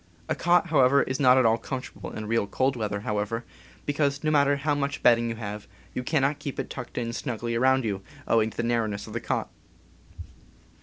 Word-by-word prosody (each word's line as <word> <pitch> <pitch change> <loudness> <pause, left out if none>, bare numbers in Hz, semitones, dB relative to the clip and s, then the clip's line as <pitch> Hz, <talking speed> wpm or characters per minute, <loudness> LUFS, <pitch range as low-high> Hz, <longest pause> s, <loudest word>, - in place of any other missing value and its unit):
A - - +1
cot, 175 0 +2
however, 140 -2 +5
is 130 +2 -3
not 130 -2 +6
at 130 - +4
all 115 +1 +4
comfort 130 -2 -5
able - - -8
in 110 - -5
real 110 -1 0
cold 130 +6 +1
weather, 105 +1 -2 0.4
because, 140 -1 0
no 155 - +2
matter 140 -1 +4
how 145 +1 0
much 140 -1 -2
bedding 120 -1 +5
you 115 - -3
have, 105 -2 -6 0.3
you - - -2
cannot 140 +1 +1
keep 140 - -5
it - - -4
tucked 125 -2 -7
in 115 -1 -2
snugly 120 -2 -3
around 130 +1 +3
you, 100 -3 -2 0.3
owing 110 -1 +3
to - - -16
the - - 0
narrowness 110 -3 -1
of 110 - -10
the 115 - -3
cot. - - -2
125 Hz, 205 wpm, -26 LUFS, 110-140 Hz, 0.4 s, not